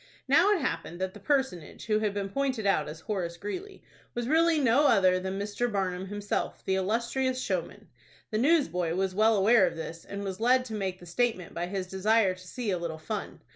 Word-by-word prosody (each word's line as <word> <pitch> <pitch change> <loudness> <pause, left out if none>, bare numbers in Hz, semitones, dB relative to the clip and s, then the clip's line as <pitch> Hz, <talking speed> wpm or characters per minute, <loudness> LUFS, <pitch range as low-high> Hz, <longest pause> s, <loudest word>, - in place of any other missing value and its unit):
Now 335 +9 +5
it 395 -6 +2
happened 175 -9 -3
that 190 0 -2
the 210 - -11
personage 260 - -1
who 215 -1 +2
had 215 -1 0
been 200 -1 -3
pointed 260 -1 -1
out 155 -7 +2
as 155 +1 -9
Horace 175 -4 -3
Greeley 365 - -6 0.3
was 240 0 -2
really 325 +2 +4
no 275 +2 +4
other 185 -3 +4
than 190 +1 -4
Mr. 210 +4 -2
Barnum 190 -2 -2
himself, 205 +1 -3
the 190 - +1
illustrious 235 +7 0
showman. - - -3 0.4
The 215 - 0
newsboy 180 - +2
was 190 0 0
well 215 +3 +4
aware 200 0 +5
of - - -4
this, 165 0 -7
and 200 0 -6
was 190 -1 -4
led 255 +2 +3
to 225 - -7
make 190 -3 -3
the 175 - -12
statement 185 -1 -1
by 175 +1 -3
his 190 0 -3
desire 195 +2 +2
to 185 0 -14
see 230 +2 -3
a 180 - -1
little 165 -2 -4
fun. 185 +7 -5
205 Hz, 210 wpm, -28 LUFS, 185-240 Hz, 0.4 s, Now